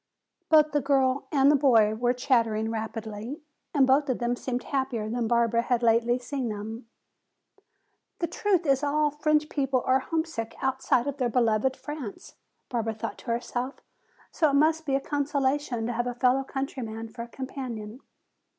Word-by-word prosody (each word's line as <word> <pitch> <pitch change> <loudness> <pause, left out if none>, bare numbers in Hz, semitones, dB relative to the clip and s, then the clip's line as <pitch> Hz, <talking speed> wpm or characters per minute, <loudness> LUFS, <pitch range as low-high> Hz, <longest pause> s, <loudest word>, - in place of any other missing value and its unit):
Both 305 -1 +6
the 290 0 +1
girl 265 -1 +1
and 280 -1 +4
boy 225 -6 +5
were 240 +2 +1
chattering 230 -4 +1
rapidly, 225 +4 -5 0.3
and 280 -3 +4
both 275 +2 +3
of 255 - +1
them 240 0 0
seemed 245 0 -3
happier 260 -6 -2
than 235 +1 -1
Barbara 235 0 +2
had 245 0 0
lately 235 +1 +3
seen 255 0 -4
them. 220 +3 -6 1.3
"The 340 - -1
truth 370 -1 0
is 275 -2 +3
all 295 +1 +2
French 300 +1 +1
people 270 -4 0
are 260 +1 +4
homesick 295 -6 -3
outside 265 -1 +1
of 285 -1 -3
their 250 -3 0
beloved 235 +2 +1
France," 295 -8 -7 0.3
Barbara 225 -2 -2
thought 215 - -5
to - - -15
herself. 245 +3 -2 0.6
"So 315 -3 +2
it - - -1
must 315 +2 +3
be 270 - +2
a - - +2
consolation 280 -4 -1
to 240 - -2
have 240 +1 -1
a 245 - -3
fellow 255 +2 +3
countryman 250 -5 -5
for 235 +2 -8
a 235 - -6
companion." 245 -3 -6
255 Hz, 165 wpm, -27 LUFS, 230-280 Hz, 1.3 s, Both